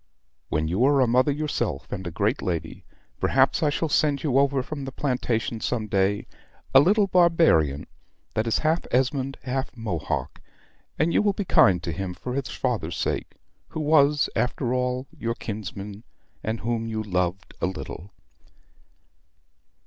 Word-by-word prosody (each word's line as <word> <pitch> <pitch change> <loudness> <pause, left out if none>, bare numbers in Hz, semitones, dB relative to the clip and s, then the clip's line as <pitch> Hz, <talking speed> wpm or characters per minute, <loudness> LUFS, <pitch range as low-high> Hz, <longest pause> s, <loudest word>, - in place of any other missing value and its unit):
When 80 0 0
you 95 +9 +1
are 140 0 +4
a 130 - +5
mother 125 +4 +3
yourself, 140 - -2
and 95 -2 -4
a - - -2
great 105 - 0
lady, 85 -4 -4 0.3
perhaps 130 +1 +3
I 155 - +3
shall 160 +3 -1
send 145 -2 +1
you 135 -4 +3
over 140 -1 +2
from 140 +1 -6
the 135 - -5
plantation 125 -5 -1
some 115 -3 -1
day 100 0 +1 0.5
a 135 - +9
little 200 +8 +4
barbarian 165 - +3 0.5
that 110 +1 0
is 115 - +2
half 160 +2 +2
Esmond 135 +1 0
half 130 0 -2
Mohock, 95 -9 -3 0.6
and 160 +2 +2
you - - +4
will 205 -1 +2
be 205 - -3
kind 90 - +4
to 85 - -2
him 90 +2 -4
for 125 - -5
his 135 0 -2
father's 110 -11 -2
sake, - - -2 0.3
who - - -6
was, 150 -1 +4
after 125 0 0
all, 125 0 -1
your 115 0 -3
kinsman; 105 -1 -6 0.4
and 110 +1 -2
whom 115 0 -1
you 110 -1 -3
loved 90 -1 -2
a - - +2
little." 95 0 -7
125 Hz, 160 wpm, -25 LUFS, 100-140 Hz, 0.6 s, a